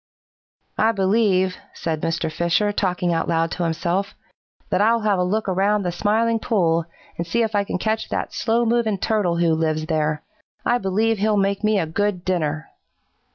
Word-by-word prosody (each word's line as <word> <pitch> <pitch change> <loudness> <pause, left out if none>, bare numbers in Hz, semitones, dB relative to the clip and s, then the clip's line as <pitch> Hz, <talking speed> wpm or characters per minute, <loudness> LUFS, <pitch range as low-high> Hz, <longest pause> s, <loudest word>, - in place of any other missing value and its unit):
"'I 225 +1 +3
believe,' 190 -2 +2 0.2
said 160 -2 -3
Mr. 165 -1 -1
Fisher, 170 +6 +1
talking 180 -3 0
out 165 - -1
loud 165 -1 +1
to 180 - -2
himself, 175 +4 -1 0.6
'that 185 - +2
I'll 230 +2 +3
have 205 -3 +1
a - - +2
look 210 +4 -1
around 200 +2 +1
the 175 - -1
Smiling 225 +5 +1
Pool 170 -8 +1 0.3
and 170 - -2
see 235 +7 +1
if 220 -1 -2
I 205 -1 +2
can 195 - -3
catch 220 +3 -2
that - - -3
slow 230 +1 +1
moving 225 -3 +1
Turtle 190 -4 0
who 170 -1 +2
lives 155 -1 0
there. 155 -1 -1 0.4
I 245 - +2
believe 215 +3 0
he'll 210 +1 +2
make 200 +1 0
me 215 0 +3
a 165 - 0
good 185 +2 -2
dinner.' 155 -4 -1
190 Hz, 180 wpm, -22 LUFS, 170-215 Hz, 0.6 s, I